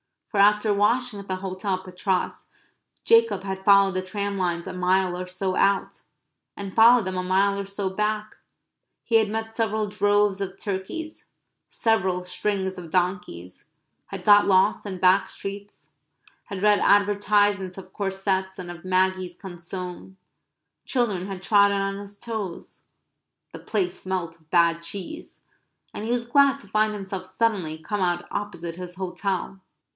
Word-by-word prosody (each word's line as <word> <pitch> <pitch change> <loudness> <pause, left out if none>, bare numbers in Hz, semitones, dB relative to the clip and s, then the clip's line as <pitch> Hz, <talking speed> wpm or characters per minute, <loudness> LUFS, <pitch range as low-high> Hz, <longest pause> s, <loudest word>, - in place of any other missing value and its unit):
For 205 - -1
after 210 +1 +4
washing 220 +2 +1
at 200 - -10
the 185 - -1
hotel 185 +1 -3
at 185 - -8
Patras, 185 0 -2 0.6
Jacob 460 - +4
had 190 -1 -5
followed 200 -1 +6
the 185 - -1
tram 200 +2 -3
lines 175 -2 -1
a - - -6
mile 185 0 +1
or 180 0 -5
so 185 +1 -2
out; 195 -1 +1 0.5
and 195 -2 -6
followed 230 +1 +7
them 185 -1 -3
a - - 0
mile 195 +2 +2
or 200 - -3
so 195 0 -3
back; 210 +2 -2 0.7
he 230 - 0
had 220 -2 +4
met 225 +1 -4
several 220 -2 0
droves 205 0 +2
of 195 0 -4
turkeys; 205 +13 -5 0.4
several 190 -6 0
strings 190 0 -2
of 170 -2 -9
donkeys; 175 - -3 0.4
had 195 -2 -7
got 205 -1 +7
lost 190 +1 +3
in 190 -3 -5
back 185 +2 +4
streets; 200 +1 -8 0.5
had 200 -3 -6
read 210 -1 +5
advertisements 205 -2 +3
of 185 -1 -11
corsets 190 -1 -2
and 180 -2 -6
of 175 0 -11
Maggi's 185 -1 +1
consomme; 180 0 -8 0.7
children 210 -8 0
had 190 -2 -7
trodden 200 -1 +4
on 195 0 -2
his 200 0 -11
toes; 210 -7 -6 0.7
the - - -9
place 185 -4 -2
smelt 175 -3 -4
of 160 -1 -30
bad 170 -1 +3
cheese; 195 - -7 0.5
and 210 - -5
he 230 - -2
was 240 -1 0
glad 280 +2 +4
to 275 - -14
find 215 +1 +1
himself 195 -2 -5
suddenly 185 -5 -1
come 195 +6 -4
out 175 -1 0
opposite 175 -5 -5
his 180 -1 -8
hotel. 190 +1 -3
195 Hz, 155 wpm, -25 LUFS, 185-205 Hz, 0.7 s, followed